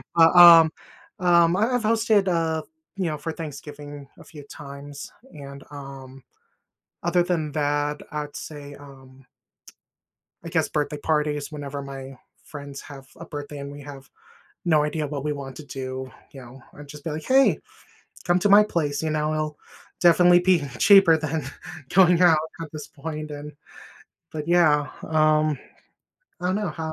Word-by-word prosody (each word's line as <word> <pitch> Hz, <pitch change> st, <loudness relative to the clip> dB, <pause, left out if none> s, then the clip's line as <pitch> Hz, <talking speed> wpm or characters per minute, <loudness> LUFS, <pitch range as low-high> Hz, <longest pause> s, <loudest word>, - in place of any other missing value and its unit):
Uh, 165 Hz, -1 st, +7 dB
um 165 Hz, -2 st, +10 dB, 0.5 s
Um, 170 Hz, -1 st, +4 dB
I 225 Hz, +6 st, +1 dB
I've 240 Hz, -, -1 dB
hosted, 220 Hz, -3 st, +2 dB
uh, 165 Hz, -2 st, 0 dB
f -, -, -23 dB, 0.3 s
you 190 Hz, -2 st, -2 dB
know, 155 Hz, -2 st, -2 dB
for 160 Hz, +3 st, -5 dB
Thanksgiving 145 Hz, -2 st, -9 dB
a -, -, -13 dB
few 150 Hz, -2 st, -12 dB
times, 140 Hz, 0 st, -10 dB, 0.2 s
and, 140 Hz, -2 st, -10 dB
um, 135 Hz, -2 st, -10 dB, 0.8 s
other 175 Hz, 0 st, +2 dB
than 165 Hz, -4 st, -2 dB
that, 145 Hz, 0 st, -1 dB
I'd 150 Hz, -1 st, -5 dB
say, 145 Hz, -2 st, -9 dB
um, 135 Hz, -2 st, -16 dB, 1.2 s
I -, -, -7 dB
guess -, -, 0 dB
birthday 150 Hz, 0 st, -2 dB
parties 150 Hz, -1 st, -1 dB
whenever 140 Hz, -1 st, -6 dB
my 135 Hz, -1 st, -9 dB, 0.3 s
friends 140 Hz, -2 st, -9 dB
have 135 Hz, -2 st, -12 dB
a 165 Hz, -, -9 dB
birthday 145 Hz, -1 st, -7 dB
and 140 Hz, 0 st, -7 dB
we 145 Hz, 0 st, -10 dB
have 135 Hz, -1 st, -11 dB, 0.6 s
no 155 Hz, -3 st, +3 dB
idea 150 Hz, 0 st, -2 dB
what 140 Hz, -1 st, -5 dB
we 150 Hz, -, -1 dB
want 135 Hz, -2 st, -8 dB
to 155 Hz, -, -10 dB
do, 130 Hz, -1 st, -6 dB, 0.2 s
you 135 Hz, -, -11 dB
know, 125 Hz, +2 st, -13 dB
I'd 145 Hz, 0 st, -12 dB
just 145 Hz, 0 st, -11 dB
be 160 Hz, -, -4 dB
like, 155 Hz, +1 st, -5 dB
"Hey, 265 Hz, +1 st, +4 dB, 0.7 s
come 175 Hz, 0 st, +2 dB
to 205 Hz, -, +2 dB
my 205 Hz, +1 st, +8 dB
place," 155 Hz, -7 st, -2 dB
you 160 Hz, -, -1 dB
know, 155 Hz, 0 st, -1 dB
"it'll 155 Hz, -1 st, -3 dB, 0.4 s
definitely 175 Hz, 0 st, +6 dB
be 180 Hz, -4 st, +3 dB, 0.2 s
cheaper 195 Hz, -5 st, +7 dB
than 155 Hz, -1 st, -3 dB, 0.5 s
going 180 Hz, -2 st, +5 dB
out 165 Hz, -3 st, +6 dB, 0.2 s
at 160 Hz, -, -7 dB
this 150 Hz, -2 st, -8 dB
point 155 Hz, 0 st, -7 dB
and" 145 Hz, +1 st, -8 dB, 0.8 s
But 150 Hz, 0 st, -5 dB
yeah, 155 Hz, -4 st, +3 dB, 0.2 s
um, 155 Hz, -2 st, +2 dB, 0.8 s
I 180 Hz, -, -2 dB
don't 185 Hz, -, 0 dB
know 210 Hz, -1 st, -2 dB
how 160 Hz, -1 st, -5 dB
150 Hz, 165 wpm, -24 LUFS, 145-165 Hz, 1.2 s, um